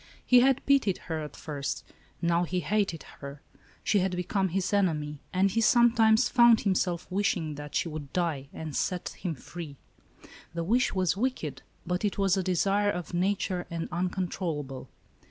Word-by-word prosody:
He 250 - +7
had 265 +1 +3
pitied 275 -9 +3
her 160 -2 -3
at 150 - -7
first; 140 -3 -4 0.4
now 170 +1 +2
he 180 +1 -1
hated 195 -2 0 0.2
her. 140 +1 -9 0.4
She 205 - +3
had 185 -1 0
become 190 +2 0
his 190 +3 -1
enemy, 150 -7 0
and 190 +1 +2
he 230 - +1
sometimes 230 0 +5
found 235 -2 +6
himself 185 -3 0
wishing 180 -5 0
that 145 0 -8
she - - +1
would 150 -3 -7
die, 160 -6 -1
and 155 -2 -6
set 180 -2 -1
him 170 -4 -5
free. 150 0 -9 0.8
The 170 - -1
wish 235 +9 +2
was 185 -2 +2
wicked, 195 - -2 0.2
but 180 +2 -2
it 205 - 0
was 195 -2 +3
a 190 - +1
desire 195 +3 +1
of 180 -3 -4
nature 185 0 0
and 165 -1 -3
un 180 +1 0
controllable. 165 -7 -4
180 Hz, 170 wpm, -28 LUFS, 160-205 Hz, 0.8 s, He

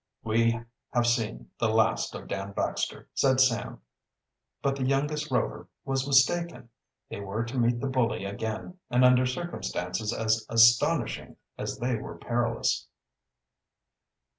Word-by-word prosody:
"We 115 +1 +2 0.3
have 120 -1 +2
seen 110 - -1
the - - +2
last - - +1
of - - -8
Dan 100 +1 -4
Baxter," - - -2
said 130 -1 +3
Sam. 115 - +1 0.8
But 135 0 +1
the 135 - -3
youngest 150 +3 0
Rover 125 -4 -1 0.2
was 135 0 -1
mistaken. 135 -1 +2 0.4
They - - -6
were 100 +3 -3
to 120 +3 -4
meet 120 0 +2
the 135 - -2
bully 115 -7 0
again, 110 - -5
and 125 +1 +4
under 125 0 +5
circumstances 110 - -3
as 110 -1 +1
astonishing 115 +1 +3 0.2
as - - -4
they 125 0 -1
were - - -8
perilous. 115 -1 -1
120 Hz, 135 wpm, -28 LUFS, 110-130 Hz, 0.8 s, under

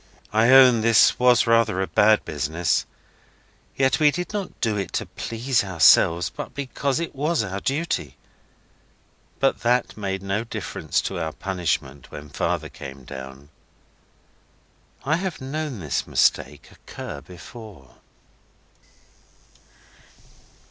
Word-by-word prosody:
I 110 +2 +4
own 130 -3 +7
this 115 0 +4
was 125 -2 +4
rather 115 -4 +2
a 95 - +1
bad 105 +2 +3
business. 80 +3 -1 0.9
Yet 135 +2 +2
we 150 -1 +6
did 180 +6 -4
not 200 -3 -5
do 110 -2 0
it 100 -4 -4
to - - -2
please 115 +1 -2
ourselves, 85 -3 +4
but - - -8
because 140 +1 -2
it 170 - -4
was 150 0 0
our 95 -1 -4
duty. 135 - -2 1.2
But 135 0 +1
that 125 +1 +1
made 95 -2 -4
no 100 +3 -1
difference 115 - -3
to 95 - -4
our 80 -1 -3
punishment 85 -7 -3
when 75 0 -10
Father 70 - -2
came 70 -1 -10
down. 65 +1 -10 1.5
I 155 +4 +1
have 185 -2 -4
known 140 -2 -4
this 75 -7 -2
mistake - - 0
occur - - -9
before. 90 - -13
110 Hz, 120 wpm, -23 LUFS, 85-135 Hz, 1.5 s, own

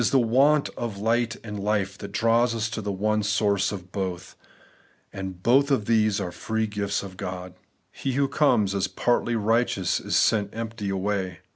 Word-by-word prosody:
the 135 - +3
want 135 +5 +4
of 115 -4 -5
light 115 +2 +1
and 105 -2 -6
life 100 -2 0
that 100 0 -8
draws 115 +2 +2
us 110 0 -2
to 110 - -3
the 105 0 -3
one 105 +2 0
source 100 -1 +1
of 95 -3 -8
both; 95 -2 -4 0.8
and 95 -2 -6
both 135 +4 +4
of 130 -7 +1
these 110 -2 +2
are 90 -3 -3
the - - -15
free 110 0 -1
gifts 105 -1 -2
of 95 -2 -9
God. 90 -1 -6 0.4
He 135 - -3
who 140 +1 +2
conies 125 -9 +2
as 100 -1 0
partly 120 -1 0
righteous 110 -3 +1
is - - -2
sent 105 -2 +2
empty 110 -3 -4
away. 95 -2 -2
105 Hz, 180 wpm, -25 LUFS, 100-115 Hz, 0.8 s, want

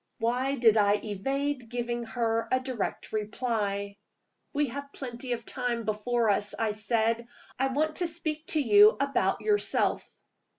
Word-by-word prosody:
Why 250 +4 0
did 230 -4 +5
I 205 -1 +4
evade 255 +5 -3
giving 240 0 -3
her 230 0 -1
a 255 - +3
direct 255 -6 -4
reply? 210 -2 -2 0.5
"We 290 -2 0
have 280 +3 -7
plenty 250 -1 -5
of 230 -1 -5
time 245 -2 -2
before 220 +1 +1
us," 205 0 0
I 225 -1 +1
said. 225 +2 0 0.3
"I 270 - +3
want 305 +4 0
to 355 - +1
speak 315 -1 -4
to 310 - +1
you 210 -5 +6
about 280 0 +1
yourself." 420 -1 +1
240 Hz, 145 wpm, -28 LUFS, 220-270 Hz, 0.5 s, you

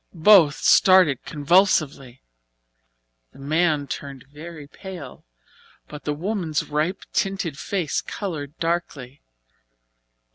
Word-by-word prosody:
Both 165 -4 +6
started 185 -8 +5
convulsively. 145 -5 +1 1.1
The - - -17
man 155 +1 0
turned 140 -2 -8
very 150 +2 -11
pale, 165 -3 -11 0.6
but 150 0 -11
the 150 - -1
woman's 170 -3 -2
ripe 155 +6 -2
tinted 195 -6 -2
face 180 -7 -2
coloured 155 -7 -6
darkly. 155 -6 -4
155 Hz, 95 wpm, -22 LUFS, 145-180 Hz, 1.1 s, Both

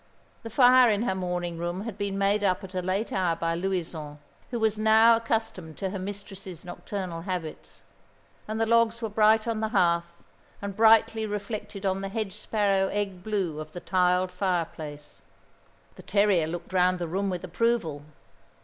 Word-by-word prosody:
The 230 - -7
fire 250 +1 +6
in 210 +1 +1
her 215 - 0
morning 180 -2 -3
room 175 +2 -3
had 220 -1 -6
been 200 -1 -3
made 200 +1 +2
up 190 0 +1
at 190 0 -9
a 185 - -1
late 190 +5 -2
hour 180 -3 +1
by 165 0 -1
Louison, 165 -4 -3 0.3
who 240 - -3
was 220 -1 +2
now 220 +2 +6
accustomed 225 -8 -3
to 190 -2 -3
her 195 - -4
mistress's 195 -2 -7
nocturnal 180 -2 -5
habits; 175 -3 -6 0.6
and 215 +1 -3
the 225 - +2
logs 230 0 +2
were 225 - -1
bright 215 +1 +3
on 225 -2 -1
the 220 - 0
hearth, 170 -5 +2 0.5
and 200 -1 -5
brightly 220 0 +4
reflected 205 -1 -5
on 190 0 0
the 195 - -4
hedge 210 -2 -3
sparrow 200 -2 +1
egg 200 -2 -3
blue 190 -7 -2
of 155 0 -8
the 175 - -6
tiled 180 +1 +1
fireplace. 165 -5 -4 0.7
The - - -13
terrier 200 -5 +2
looked 175 +3 -6
round 185 0 +3
the 175 -1 -3
room 195 +4 -1
with 180 -2 -4
approval. 185 -5 0
195 Hz, 175 wpm, -27 LUFS, 180-215 Hz, 0.7 s, fire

